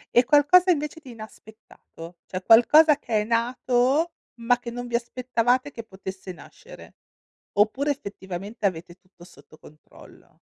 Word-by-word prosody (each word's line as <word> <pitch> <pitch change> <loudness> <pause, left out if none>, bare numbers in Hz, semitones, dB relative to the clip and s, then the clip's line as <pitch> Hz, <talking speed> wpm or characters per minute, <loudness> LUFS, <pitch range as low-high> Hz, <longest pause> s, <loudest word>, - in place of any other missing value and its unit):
E 245 +1 +5
qualcosa, 300 +7 +4
invece, 300 0 -3
di 260 -5 -12
inaspettato, 215 -6 -14
cioè 185 - -6
qualcosa 295 +8 +6
che 220 -3 -2
è - - -2
nato, 250 +6 0 0.3
ma 245 +1 +1
che 240 - -8
non 245 +1 -7
vi 235 - -3
aspettavate 250 +2 -1
che 230 - -9
potesse 190 -2 -9
nascere? - - -15 0.6
Oppure, 240 +8 +1
effettivamente, 200 -4 -7
avete 175 -2 -3
tutto 185 -2 -22
sotto 170 -3 -18
controllo? 150 -1 -19
235 Hz, 135 wpm, -24 LUFS, 195-260 Hz, 0.6 s, qualcosa